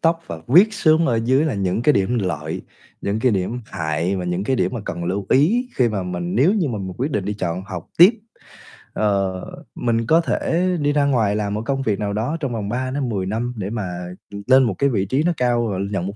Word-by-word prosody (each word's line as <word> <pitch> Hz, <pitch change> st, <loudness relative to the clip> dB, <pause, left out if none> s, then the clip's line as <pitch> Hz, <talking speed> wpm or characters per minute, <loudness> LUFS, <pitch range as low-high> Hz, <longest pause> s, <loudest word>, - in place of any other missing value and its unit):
tóc 165 Hz, 0 st, +2 dB
và 85 Hz, -, -6 dB
viết 185 Hz, -, +6 dB
xuống 160 Hz, -3 st, +3 dB
ở 115 Hz, -, +1 dB
dưới 130 Hz, +5 st, +3 dB
là 155 Hz, -, -1 dB
những 100 Hz, +2 st, -1 dB
cái 150 Hz, -, +5 dB
điểm 115 Hz, +4 st, +1 dB
lợi, 80 Hz, -4 st, -3 dB, 0.4 s
những 100 Hz, +2 st, -1 dB
cái 125 Hz, -2 st, +3 dB
điểm 100 Hz, +6 st, -2 dB
hại 80 Hz, +4 st, -2 dB
và 90 Hz, -, -3 dB
những 90 Hz, +2 st, -2 dB
cái 130 Hz, +4 st, +1 dB
điểm -, -, 0 dB
mà 115 Hz, -, -3 dB
cần 85 Hz, -3 st, -4 dB
lưu 95 Hz, +3 st, -2 dB
ý 220 Hz, -, +3 dB
khi 125 Hz, -2 st, +3 dB
mà 100 Hz, -4 st, -2 dB
mình 90 Hz, -1 st, -4 dB
nếu 150 Hz, -, +4 dB
như 185 Hz, -8 st, +1 dB
mà 110 Hz, -5 st, -3 dB
mình 95 Hz, -1 st, -5 dB
quyết 135 Hz, +5 st, -2 dB
định 105 Hz, -7 st, -1 dB
đi 105 Hz, +1 st, -2 dB
chọn 90 Hz, -2 st, -3 dB
học 90 Hz, -4 st, -7 dB
tiếp. 180 Hz, +5 st, +10 dB, 0.8 s
Ờ, 100 Hz, -3 st, 0 dB, 0.3 s
mình 115 Hz, -1 st, 0 dB
có 165 Hz, +1 st, +5 dB
thể 170 Hz, +2 st, 0 dB
đi 145 Hz, 0 st, +1 dB
ra 145 Hz, -1 st, +2 dB
ngoài 110 Hz, -7 st, +2 dB
làm 105 Hz, -1 st, -2 dB
một 105 Hz, -, -2 dB
công 135 Hz, +1 st, -1 dB
việc 110 Hz, -5 st, -1 dB
nào 100 Hz, -1 st, -2 dB
đó 120 Hz, +10 st, -1 dB
trong 135 Hz, -5 st, -3 dB
vòng 105 Hz, -3 st, -3 dB
3-10 125 Hz, -4 st, -2 dB
năm 115 Hz, +5 st, -2 dB
để 100 Hz, -2 st, -3 dB
mà, 110 Hz, -1 st, -3 dB, 0.5 s
ừm, 100 Hz, 0 st, -7 dB
lên 130 Hz, +1 st, +6 dB
một 110 Hz, -5 st, +1 dB
cái 140 Hz, -, +2 dB
vị 100 Hz, -6 st, 0 dB
trí 135 Hz, +10 st, 0 dB
nó 175 Hz, -, +2 dB
cao 120 Hz, -2 st, +1 dB
và 95 Hz, -, -2 dB
nhận 95 Hz, -2 st, -2 dB
một 100 Hz, -, -5 dB
110 Hz, 245 wpm, -21 LUFS, 95-135 Hz, 0.8 s, tiếp